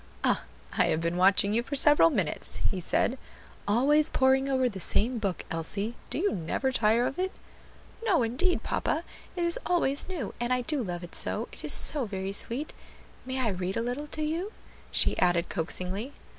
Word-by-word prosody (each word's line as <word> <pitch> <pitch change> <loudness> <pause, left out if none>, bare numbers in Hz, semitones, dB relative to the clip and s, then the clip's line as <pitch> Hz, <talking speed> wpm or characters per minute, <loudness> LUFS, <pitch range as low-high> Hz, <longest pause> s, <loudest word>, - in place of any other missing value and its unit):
"Ah! - - +1 0.3
I - - +5
have 155 - 0
been 170 +1 -2
watching 195 +2 +3
you 230 - +2
for 280 +4 -5
several 295 +3 +6
minutes," 190 - -3
he 190 - -4
said; 250 +8 -1 0.5
"always 290 +8 +3
poring 265 +1 +2
over 260 -1 +1
the 200 -5 -6
same 230 +6 +2
book, 195 -4 -3
Elsie; 200 +7 -3 0.2
do - - -4
you 395 +6 0
never 185 +10 -2
tire 230 0 +2
of 270 - -4
it?" 375 +1 -1 0.7
"No, 380 - +2
indeed, 260 +11 0
papa; 320 - -2 0.3
it 350 - -2
is 340 0 +7
always 330 -4 +2
new, 320 - -5
and 240 +1 -2
I 250 0 +1
do 285 +3 -2
love 175 -5 -5
it 175 - -11
so; - - +2
it - - -14
is - - 0
so 285 -5 +6
very 195 -2 -5
sweet. 240 +8 -1 0.5
May 260 0 -3
I 235 - 0
read 185 -1 -3
a 230 - -1
little 250 +5 -4
to 310 +1 -4
you?" 335 +7 -3 0.4
she - - +1
added 175 -1 +1
coaxingly. 190 - -4
240 Hz, 190 wpm, -27 LUFS, 195-295 Hz, 0.7 s, is